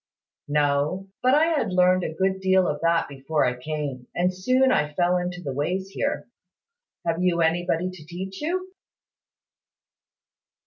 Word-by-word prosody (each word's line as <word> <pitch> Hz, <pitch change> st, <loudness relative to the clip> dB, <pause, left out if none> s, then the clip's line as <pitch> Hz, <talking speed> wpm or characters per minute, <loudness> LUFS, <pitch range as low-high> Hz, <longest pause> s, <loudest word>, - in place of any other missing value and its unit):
"No: 150 Hz, +6 st, 0 dB
but 255 Hz, +2 st, +4 dB
I 305 Hz, +2 st, +5 dB
had 300 Hz, -, 0 dB
learned 180 Hz, 0 st, +4 dB
a -, -, -2 dB
good 190 Hz, +1 st, 0 dB
deal 190 Hz, -1 st, +3 dB
of 145 Hz, -, -2 dB
that 165 Hz, 0 st, +2 dB
before 140 Hz, +2 st, -1 dB
I 125 Hz, -, +1 dB
came; 135 Hz, -2 st, -5 dB
and 180 Hz, +1 st, +1 dB
so 185 Hz, +7 st, -5 dB, 0.2 s
I 150 Hz, -11 st, +2 dB
soon 150 Hz, -, -17 dB
fell 180 Hz, 0 st, +2 dB
into 180 Hz, 0 st, -4 dB
the 140 Hz, -, -3 dB
ways 180 Hz, +8 st, -2 dB
here. -, -, -2 dB, 0.8 s
Have 165 Hz, +1 st, 0 dB
you 175 Hz, -2 st, +2 dB
anybody 175 Hz, +2 st, +1 dB
to 170 Hz, -5 st, -12 dB
teach 190 Hz, +3 st, -6 dB
you?" 365 Hz, +4 st, -2 dB
180 Hz, 160 wpm, -25 LUFS, 150-190 Hz, 0.8 s, I